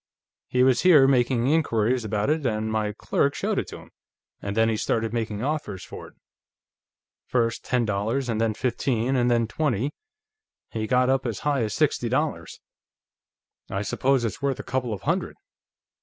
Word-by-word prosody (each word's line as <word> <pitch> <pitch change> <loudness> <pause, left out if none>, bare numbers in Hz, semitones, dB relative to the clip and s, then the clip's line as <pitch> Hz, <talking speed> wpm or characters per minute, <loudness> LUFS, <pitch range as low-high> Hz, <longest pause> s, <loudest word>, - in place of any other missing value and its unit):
"He 125 0 +2
was 130 -1 +4
here, 160 -7 +7
making 125 -2 +2
inquiries 125 -5 +1
about 105 +4 0
it, 155 -1 0
and 110 -3 -1
my 110 -1 0
clerk 140 +6 0
showed - - -1
it - - -4
to - - -8
him, - - -15 0.5
and 100 +1 -4
then 115 0 +4
he 115 - +1
started 110 +1 -1
making 110 -2 -2
offers 140 -10 -3
for - - -9
it - - -18 1.1
first 115 -2 0
ten 125 -2 0
dollars, 110 +6 -1
and 115 -2 -1
then 110 -2 +1
fifteen, 125 +1 0
and 125 -1 +2
then 120 -1 +2
twenty; 135 +2 -1 0.8
he 110 -1 -3
got 125 +1 +3
up 135 0 +1
as 115 - -4
high 145 -3 +1
as 110 -3 -2
sixty - - +1
dollars. - - -2 1.1
I 100 +1 -2
suppose 130 +3 +1
it's 110 +2 -4
worth 140 -2 -1
a - - -5
couple 125 -2 -2
of 105 - -5
hundred." - - -1
120 Hz, 175 wpm, -25 LUFS, 110-130 Hz, 1.1 s, here